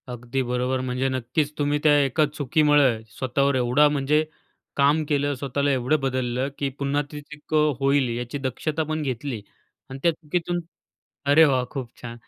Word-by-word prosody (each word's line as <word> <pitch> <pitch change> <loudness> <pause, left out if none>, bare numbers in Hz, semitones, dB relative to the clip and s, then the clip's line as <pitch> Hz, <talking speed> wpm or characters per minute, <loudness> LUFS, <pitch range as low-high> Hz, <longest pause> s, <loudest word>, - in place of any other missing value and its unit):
अगदी 120 +2 -3
बरोबर. 125 +1 -1
म्हणजे 130 +1 -1
नक्कीच 130 +4 -1
तुम्ही 145 0 +1
त्या 150 -2 +5
एका 140 +3 +2
चुकीमुळे 145 -3 +2 0.2
स्वतःवर 140 +2 +1
एवढा 125 +4 +4
म्हणजे 145 +1 +1 0.5
काम 145 +3 +3
केलं, 145 -1 +1
स्वतःला 140 +2 -1
एवढं 135 +4 +1
बदललं, 130 -1 -1
की 140 - -1
पुन्हा 140 +1 0
ती 150 -1 -7
चूक 150 +1 -12
अ, 150 -1 +3
होईल 135 -1 +2
याची 120 +3 -4
दक्षता 145 +4 -2
पण 155 0 -3
घेतली 130 -4 -3 0.5
आणि 135 0 -7
त्या 170 - +5
चुकीतून 170 +2 -3 0.7
अरे 145 +3 +6
वाह! 130 -4 +2
खूप 130 -5 -5
छान. 120 -1 -7
140 Hz, 160 wpm, -24 LUFS, 130-150 Hz, 0.7 s, अरे